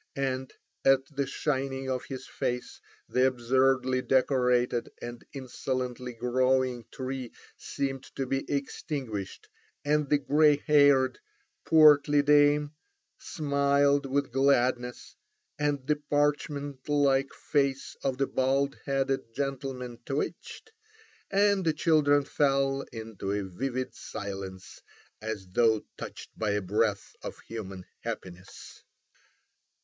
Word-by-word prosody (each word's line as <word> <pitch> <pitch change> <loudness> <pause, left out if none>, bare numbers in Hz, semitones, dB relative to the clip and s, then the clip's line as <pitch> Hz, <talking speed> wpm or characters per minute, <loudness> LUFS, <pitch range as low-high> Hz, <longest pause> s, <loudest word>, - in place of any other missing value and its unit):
And 130 -1 -2 0.3
at 135 0 +4
the 140 -1 0
shining 135 -2 -2
of 130 -1 -2
his 130 -2 -7
face 125 0 -4 0.3
the 130 +1 +3
absurdly 130 +1 +2
decorated 125 -2 +2
and 120 0 -7
insolently 125 -1 -4
growing 125 0 +1
tree 130 -2 -5 0.2
seemed 135 -1 -4
to 135 - -2
be 135 +1 -1
extinguished, 135 -7 -4 0.4
and 150 -1 +1
the 150 - +5
grey 150 +1 +4
haired, 140 -3 +5 0.5
portly 150 -2 +6
dame 145 0 +4 0.5
smiled 140 -2 +2
with 140 0 0
gladness, 125 -2 +1 0.4
and 145 -2 0
the 150 +1 +1
parchment 145 -1 -1
like 140 -2 +3
face 140 -2 -1
of 135 -2 0
the 135 - +2
bald 135 +1 0
headed 135 -3 -1
gentleman 135 -3 -4
twitched, 150 - -4 0.6
and 200 -1 +3
the 160 -2 +2
children 150 -2 +3
fell 135 -1 +1
into 110 -4 -5
a 100 0 -1
vivid 130 +7 -3
silence 95 -3 -7 0.4
as 110 -3 -4
though 110 +2 +2
touched - - -8
by 110 - -1
a 105 - 0
breath 105 +1 0
of - - -7
human 95 -5 -7
happiness. 95 +1 -8
135 Hz, 110 wpm, -28 LUFS, 125-140 Hz, 0.6 s, portly